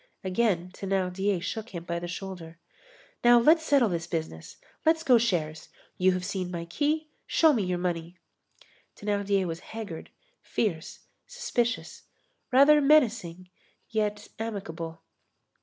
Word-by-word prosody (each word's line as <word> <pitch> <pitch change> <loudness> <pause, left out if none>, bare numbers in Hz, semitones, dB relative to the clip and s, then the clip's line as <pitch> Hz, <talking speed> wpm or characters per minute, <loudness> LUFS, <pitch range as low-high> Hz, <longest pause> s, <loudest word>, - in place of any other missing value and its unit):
Again 185 -2 0
Thénardier 195 0 -1
shook 220 +1 -5
him 170 - -5
by 170 0 -3
the 175 - -5
shoulder. 180 -2 -7 0.7
"Now 240 0 +7
let's 315 +7 +5
settle 280 -6 +4
this 170 -2 -3
business. 160 - -5 0.3
Let's 320 0 +3
go 250 -6 +6
shares. 165 -9 -1 0.3
You 185 0 +3
have 180 0 -3
seen 190 -2 -3
my 170 -1 -4
key, 300 - -1 0.2
show 320 -2 +5
me 230 - +1
your 180 -2 -1
money." 175 -1 -3 0.8
Thénardier 200 -2 0
was 165 -1 -4
haggard, 210 -7 -8 0.3
fierce, 170 -7 -3 0.3
suspicious, 475 - -2 0.5
rather 285 +3 +7
menacing, 220 - +2 0.4
yet 210 -2 -1
amicable. 165 -7 -5
195 Hz, 125 wpm, -28 LUFS, 175-235 Hz, 0.8 s, Now